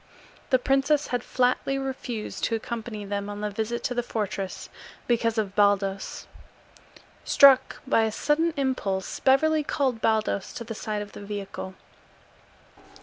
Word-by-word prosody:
The 260 Hz, -, +5 dB
princess 275 Hz, +3 st, +2 dB
had 245 Hz, -1 st, 0 dB
flatly 255 Hz, +2 st, +1 dB
refused 260 Hz, -5 st, -5 dB
to 230 Hz, -, 0 dB
accompany 220 Hz, -2 st, -5 dB
them 200 Hz, 0 st, -3 dB
on 205 Hz, 0 st, -6 dB
the 210 Hz, 0 st, -2 dB
visit 220 Hz, +3 st, -3 dB
to 250 Hz, -, -1 dB
the 245 Hz, -, 0 dB
fortress 200 Hz, -5 st, -4 dB, 0.4 s
because 230 Hz, -1 st, +1 dB
of 205 Hz, -3 st, -1 dB
Baldos. 200 Hz, -1 st, +1 dB, 1.0 s
Struck 275 Hz, -2 st, +6 dB
by 225 Hz, -4 st, +3 dB
a 220 Hz, -, -1 dB
sudden 315 Hz, +8 st, +1 dB
impulse, 230 Hz, -9 st, -1 dB
Beverly 305 Hz, +3 st, +3 dB
called 260 Hz, -5 st, -1 dB
Baldos 220 Hz, -3 st, 0 dB
to 235 Hz, -, -6 dB
the 225 Hz, 0 st, -6 dB
side 210 Hz, -1 st, -3 dB
of 205 Hz, -, -12 dB
the -, -, -10 dB
vehicle. 200 Hz, -2 st, -6 dB
225 Hz, 145 wpm, -26 LUFS, 205-265 Hz, 1.0 s, Struck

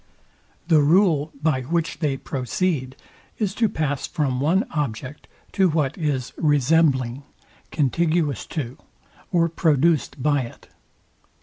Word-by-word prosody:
The 160 Hz, -3 st, +5 dB
rule, 160 Hz, -1 st, +3 dB
by 150 Hz, -5 st, +2 dB
which 165 Hz, +5 st, -2 dB
they 145 Hz, -5 st, 0 dB
proceed, 130 Hz, +2 st, -2 dB, 0.4 s
is 205 Hz, -4 st, -1 dB
to 225 Hz, 0 st, +1 dB
pass 145 Hz, -5 st, -2 dB
from 140 Hz, -6 st, -1 dB
one 175 Hz, -, +2 dB
object 140 Hz, -1 st, -4 dB, 0.2 s
to 190 Hz, -2 st, +3 dB
what 150 Hz, -4 st, 0 dB
is 145 Hz, -7 st, -2 dB
resembling, 145 Hz, -4 st, +2 dB, 0.5 s
contiguous 155 Hz, -, 0 dB
to, 130 Hz, -5 st, -5 dB, 0.5 s
or 170 Hz, -2 st, +3 dB
produced 160 Hz, -3 st, +1 dB
by 145 Hz, -2 st, +2 dB
it. 120 Hz, -, -10 dB
150 Hz, 115 wpm, -23 LUFS, 135-165 Hz, 0.5 s, The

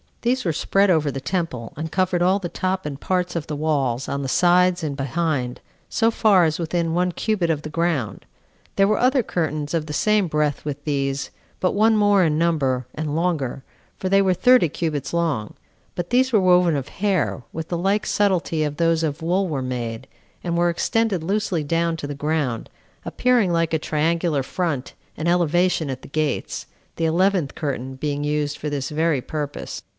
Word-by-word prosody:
These 250 Hz, 0 st, +1 dB
were 165 Hz, -, +1 dB
spread 195 Hz, +5 st, +2 dB
over 155 Hz, -4 st, +2 dB
the 135 Hz, -, -5 dB
temple, 150 Hz, -9 st, -3 dB
and 160 Hz, +2 st, -5 dB
covered 185 Hz, -1 st, +1 dB
all 185 Hz, +2 st, +4 dB
the 180 Hz, -4 st, -4 dB
top 185 Hz, +2 st, -2 dB
and 140 Hz, -2 st, -5 dB
parts 180 Hz, 0 st, -1 dB
of 165 Hz, -3 st, -3 dB
the 150 Hz, -, -3 dB
walls, 140 Hz, -5 st, 0 dB
on 140 Hz, -, -2 dB
the 135 Hz, -, -3 dB
sides 180 Hz, +4 st, +3 dB
and 145 Hz, -3 st, -2 dB
behind, 135 Hz, -2 st, -2 dB, 0.3 s
so 225 Hz, 0 st, +2 dB
far 205 Hz, -5 st, +4 dB
as 155 Hz, +1 st, -1 dB
within 165 Hz, 0 st, -1 dB
one 180 Hz, +1 st, +1 dB
cubit 190 Hz, -2 st, -1 dB
of 155 Hz, -3 st, 0 dB
the 155 Hz, -, -5 dB
ground. 160 Hz, -8 st, -1 dB, 0.5 s
There 195 Hz, -, +4 dB
were 215 Hz, -, +1 dB
other 255 Hz, 0 st, +3 dB
curtains 155 Hz, -5 st, -2 dB
of 160 Hz, -2 st, -1 dB
the 150 Hz, -, -5 dB
same 210 Hz, +2 st, +2 dB
breadth 150 Hz, -2 st, 0 dB
with 145 Hz, -1 st, -5 dB
these, 140 Hz, -2 st, -1 dB, 0.3 s
but 185 Hz, -, +1 dB
one 220 Hz, +2 st, +4 dB
more 205 Hz, -2 st, +4 dB
in 155 Hz, -3 st, +2 dB
number, 140 Hz, -7 st, +1 dB
and 150 Hz, -1 st, -3 dB
longer, 155 Hz, -6 st, -1 dB, 0.3 s
for 185 Hz, -, -3 dB
they 195 Hz, +1 st, +5 dB
were 185 Hz, -1 st, +2 dB
thirty 250 Hz, -2 st, +5 dB
cubits 150 Hz, -3 st, -3 dB
long; 160 Hz, -11 st, -1 dB, 0.4 s
but 175 Hz, +2 st, -4 dB
these 260 Hz, +1 st, +3 dB
were 215 Hz, -4 st, +4 dB
woven 180 Hz, -3 st, +4 dB
of 135 Hz, -1 st, -3 dB
hair, 190 Hz, -8 st, -1 dB
with 160 Hz, 0 st, -6 dB
the 175 Hz, -, -1 dB
like 195 Hz, +4 st, +1 dB
subtilty 180 Hz, -6 st, +1 dB
as 150 Hz, -1 st, -2 dB
those 165 Hz, 0 st, +2 dB
of 155 Hz, -1 st, -2 dB
wool 185 Hz, +3 st, +1 dB
were 145 Hz, -5 st, -2 dB
made, 120 Hz, -1 st, -4 dB, 0.4 s
and 170 Hz, -1 st, -1 dB
were 175 Hz, 0 st, +3 dB
extended 200 Hz, +1 st, 0 dB
loosely 190 Hz, -3 st, 0 dB
down 165 Hz, +2 st, 0 dB
to 150 Hz, -, -5 dB
the 145 Hz, -, -5 dB
ground, 145 Hz, -5 st, -2 dB, 0.4 s
appearing 245 Hz, -7 st, +2 dB
like 165 Hz, -1 st, +1 dB
a 160 Hz, -, +2 dB
triangular 160 Hz, -1 st, 0 dB
front 150 Hz, -3 st, -3 dB, 0.2 s
and 155 Hz, -, -2 dB
elevation 175 Hz, -2 st, +2 dB
at 130 Hz, -, -7 dB
the -, -, -10 dB
gates, 150 Hz, -1 st, -2 dB, 0.3 s
the 165 Hz, -, 0 dB
eleventh 175 Hz, -2 st, +1 dB
curtain 135 Hz, -3 st, -3 dB
being 145 Hz, +1 st, -2 dB
used 150 Hz, 0 st, -1 dB
for 150 Hz, -, -4 dB
this 140 Hz, -2 st, -3 dB
very 155 Hz, -2 st, +1 dB
purpose. 145 Hz, +1 st, -5 dB
165 Hz, 190 wpm, -22 LUFS, 145-185 Hz, 0.5 s, they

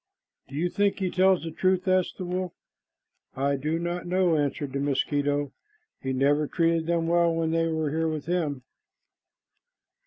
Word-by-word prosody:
"Do 135 Hz, -, -10 dB
you 165 Hz, +4 st, +1 dB
think 200 Hz, +2 st, +1 dB
he 185 Hz, -2 st, -1 dB
tells 185 Hz, -1 st, +3 dB
the 165 Hz, -, -4 dB
truth?" 185 Hz, +3 st, +1 dB
asked 185 Hz, -1 st, +2 dB
the 185 Hz, -, -4 dB
wolf. 180 Hz, 0 st, -3 dB, 0.8 s
"I 140 Hz, +1 st, +1 dB
do 155 Hz, +4 st, -1 dB
not 175 Hz, +1 st, -3 dB
know," 180 Hz, -2 st, +2 dB
answered 145 Hz, -2 st, -1 dB
the 140 Hz, -, -1 dB
mosquito. 145 Hz, 0 st, 0 dB, 0.5 s
"He 130 Hz, -, -2 dB
never 145 Hz, +3 st, +2 dB
treated 165 Hz, 0 st, +1 dB
them 170 Hz, -1 st, +1 dB
well 170 Hz, 0 st, +3 dB
when 165 Hz, -1 st, 0 dB
they 165 Hz, 0 st, +1 dB
were 160 Hz, 0 st, 0 dB
with 155 Hz, -2 st, -4 dB
him." 155 Hz, -6 st, -1 dB
165 Hz, 160 wpm, -26 LUFS, 145-175 Hz, 0.8 s, tells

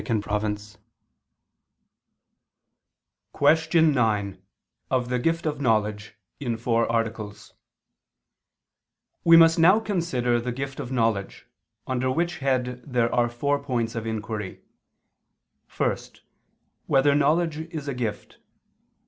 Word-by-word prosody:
_______________________ 105 Hz, -1 st, -3 dB, 2.6 s
QUESTION 160 Hz, +2 st, +3 dB
9 105 Hz, -6 st, 0 dB, 0.5 s
OF 125 Hz, -2 st, 0 dB
THE 125 Hz, 0 st, 0 dB
GIFT 165 Hz, +6 st, 0 dB
OF 150 Hz, -2 st, -2 dB
KNOWLEDGE 110 Hz, -3 st, 0 dB, 0.2 s
(In 120 Hz, -5 st, -2 dB
Four 115 Hz, 0 st, 0 dB
Articles) 110 Hz, -2 st, -3 dB, 1.7 s
We 165 Hz, 0 st, +7 dB
must 165 Hz, 0 st, +6 dB
now 185 Hz, +6 st, +6 dB
consider 130 Hz, -, -1 dB
the 125 Hz, +1 st, -3 dB
gift 135 Hz, +2 st, -5 dB
of 125 Hz, -, -6 dB
knowledge, 115 Hz, -5 st, -1 dB, 0.4 s
under 130 Hz, 0 st, -1 dB
which 170 Hz, +5 st, -1 dB
head 125 Hz, -2 st, -1 dB
there 120 Hz, -3 st, 0 dB
are 120 Hz, -1 st, +2 dB
four 140 Hz, +4 st, -1 dB
points 120 Hz, -4 st, -2 dB
of 115 Hz, -1 st, -4 dB
inquiry: 110 Hz, -2 st, -5 dB, 1.2 s
(1) -, -, +1 dB, 0.9 s
Whether 140 Hz, +1 st, +4 dB
knowledge 155 Hz, +2 st, +1 dB
is 155 Hz, -4 st, -6 dB
a 140 Hz, -, -2 dB
gift? 115 Hz, -4 st, -5 dB
125 Hz, 105 wpm, -25 LUFS, 115-145 Hz, 2.6 s, We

